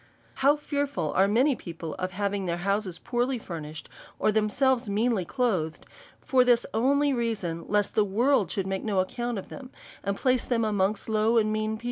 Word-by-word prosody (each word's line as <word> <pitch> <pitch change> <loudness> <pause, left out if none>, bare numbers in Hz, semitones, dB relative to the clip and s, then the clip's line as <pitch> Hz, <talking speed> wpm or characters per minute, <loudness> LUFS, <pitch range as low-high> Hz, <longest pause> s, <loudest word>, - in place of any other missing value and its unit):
How 280 +2 +5
fearful 285 - -2
are 190 +2 +4
many 250 +7 +3
people 165 -5 -7
of 185 - -1
having 200 0 -1
their 170 0 -1
houses 200 -3 -1
poorly 245 +2 -1
furnished, 160 -7 -7 0.3
or 215 - +2
themselves 220 +3 +2
meanly 210 -2 +1
clothed^ 185 - -1 0.4
for 255 -2 +3
this 245 -1 +3
only 280 +5 +2
reason, 200 -9 -2
lest 205 0 +1
the 215 - +3
world 215 - +2
should 195 - -2
make 190 0 -3
no 205 -4 0
ac - - -17
count 240 -1 -2
of 195 - -7
them, 265 -3 -9 0.3
and 200 0 -2
place 255 -2 +2
them 230 -2 0
amongst 205 -1 0
low 220 +1 +2
and 215 -1 +2
mean 215 0 -1
people 220 - -6
215 Hz, 185 wpm, -27 LUFS, 195-245 Hz, 0.4 s, How